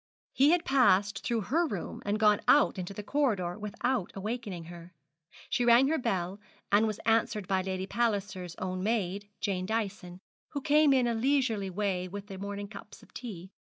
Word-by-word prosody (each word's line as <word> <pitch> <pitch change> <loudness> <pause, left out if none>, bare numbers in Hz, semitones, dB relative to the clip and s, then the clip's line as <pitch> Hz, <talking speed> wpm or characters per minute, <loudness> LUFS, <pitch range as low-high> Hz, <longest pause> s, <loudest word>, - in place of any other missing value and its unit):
He 275 +3 +5
had 345 +1 +3
passed 205 -7 +3
through 235 -2 0
her 325 - +1
room 200 - -5
and 210 +1 0
gone 210 -1 +4
out 285 -8 +5
into 180 +1 -5
the 205 +1 -7
corridor, 210 -9 0
without 210 +1 -2
awakening 205 -3 -4
her. 170 +1 -12 0.5
She 245 - 0
rang 240 +3 +6
her 320 - +1
bell, 190 -4 -2 0.3
and 210 +2 +5
was 215 -1 -3
answered 220 -3 +1
by 190 0 +1
Lady 185 0 -3
Palliser's 195 -5 -2
own 185 0 -4
maid, 205 -1 -1
Jane 185 -3 -1
Dyson, 200 -5 -3 0.3
who 285 - -2
came 300 0 +4
in 260 -2 +4
a 235 - +1
leisurely 230 -5 +1
way 185 -1 -1
with 200 +2 -7
the 195 -2 -9
morning 200 0 -5
cups 205 0 -12
of - - -20
tea. 190 -7 -8
205 Hz, 180 wpm, -30 LUFS, 190-240 Hz, 0.5 s, rang